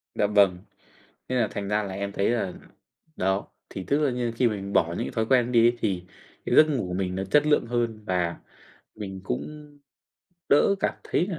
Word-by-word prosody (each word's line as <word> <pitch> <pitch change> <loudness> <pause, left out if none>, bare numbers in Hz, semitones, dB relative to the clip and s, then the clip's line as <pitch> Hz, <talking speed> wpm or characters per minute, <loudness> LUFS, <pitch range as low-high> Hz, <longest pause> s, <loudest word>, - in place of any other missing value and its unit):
Dạ 105 - +2
vâng. 100 -3 +4 0.7
Thế 130 - -1
là 115 -4 +2
thành 100 -1 -4
ra 105 +1 +1
là 95 -2 -5
em 100 +1 -4
thấy 100 +2 +1
là 115 -6 -1 0.6
đó, 95 +1 0 0.2
thì 95 - -6
tức 140 - +2
là 150 -2 +2
như 120 -1 -2
khi 125 - +3
mình 100 -2 -5
bỏ 85 - +4
những 85 - -3
cái - - -5
thói 110 -1 -1
quen 125 0 +4
ấy 125 - -5
đi 115 -1 +5
ấy 120 +1 +2
thì 95 -6 -1 0.4
cái - - 0
giấc 155 - +8
ngủ 140 -8 -1
của 90 - -4
mình 90 -1 -2
nó 95 +1 -2
chất 145 +10 +3
lượng 150 -5 +3
hơn 115 -2 -2
và 90 -3 -1 0.6
mình 95 -3 -6
cũng 150 +8 -5 0.8
đỡ 145 +7 +5
cảm - - 0
thấy 175 - 0
là 185 -5 -4
105 Hz, 220 wpm, -26 LUFS, 95-125 Hz, 0.8 s, giấc